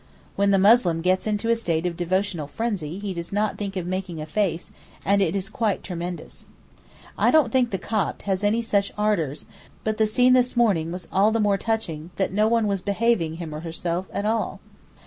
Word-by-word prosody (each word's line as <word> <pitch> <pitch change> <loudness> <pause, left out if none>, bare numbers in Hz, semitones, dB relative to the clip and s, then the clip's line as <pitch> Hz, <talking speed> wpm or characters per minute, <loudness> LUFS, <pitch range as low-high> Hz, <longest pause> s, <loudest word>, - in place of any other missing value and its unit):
When 200 0 +2
the 195 - +4
Muslim 190 -5 +4
gets 185 +4 +1
into 215 +2 0
a - - +4
state 170 -7 -1
of 175 -1 -1
devotional 180 -2 -1
frenzy 190 -5 -3
he 200 -1 -4
does 170 -1 -6
not 210 +1 -1
think 200 -2 -4
of 180 - -3
making 185 -2 -4
a 155 - -4
face, 170 0 -1 0.3
and 200 +1 +3
it 185 -1 +1
is 195 -1 -1
quite 215 -3 -1
tremendous. 175 -1 -6 0.7
I - - +4
don't 305 -8 +4
think 250 -1 +3
the 195 - -2
Copt 210 +2 -2
has 195 0 -1
any 220 +3 +2
such 200 -3 +1
ardours, 170 -9 0 0.4
but 215 0 -1
the 220 - +4
scene 250 +4 +4
this 250 -1 +2
morning 185 -9 +2
was 180 0 -6
all 200 +3 +4
the 225 - +1
more 205 -2 +2
touching 175 -8 -2
that 190 -1 -1
no 210 +2 +3
one 230 -1 +2
was 200 -2 0
'behaving 200 -5 +1
him 165 -2 -6
or 150 - -5
herself' 170 +2 -3
at 200 - -3
all. 225 +1 -1
195 Hz, 205 wpm, -24 LUFS, 175-215 Hz, 0.7 s, the